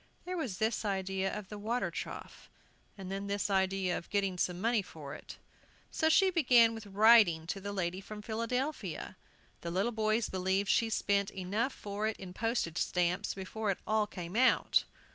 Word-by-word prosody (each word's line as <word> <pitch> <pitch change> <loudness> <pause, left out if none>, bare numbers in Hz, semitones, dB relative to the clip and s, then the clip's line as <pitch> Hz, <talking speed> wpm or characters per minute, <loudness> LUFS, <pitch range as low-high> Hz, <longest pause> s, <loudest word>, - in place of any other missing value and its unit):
There 365 +1 -3
was 255 - -3
this 220 +1 0
idea 195 -1 -1
of 210 -2 -6
the 210 - -7
water 230 +4 -1
trough, - - -7 0.5
and 190 -1 -7
then 195 +1 -4
this 200 0 -1
idea 190 -1 +1
of - - -6
getting 195 -3 0
some 180 0 0
money 225 +2 +2
for 155 -7 -9
it. - - -10 0.5
So 315 - +2
she 380 +4 +5
began 245 -9 +5
with 225 -2 -8
writing 200 -5 +5
to 195 +4 -4
the 200 +1 -4
lady 185 -1 -2
from 210 +1 -9
Philadelphia. 240 +7 -3 0.5
The 170 - -4
little 195 +7 0
boys 220 0 +1
believed 190 +1 0
she 230 - +3
spent 200 -2 +1
enough 205 +8 -2
for 210 -2 -4
it 220 - -2
in 185 -2 -9
postage 220 -7 -1
stamps 180 +3 0
before 200 +3 -4
it 195 - +1
all 215 -1 +1
came 180 -2 -7
out. 255 +2 +4
200 Hz, 180 wpm, -32 LUFS, 190-225 Hz, 0.5 s, she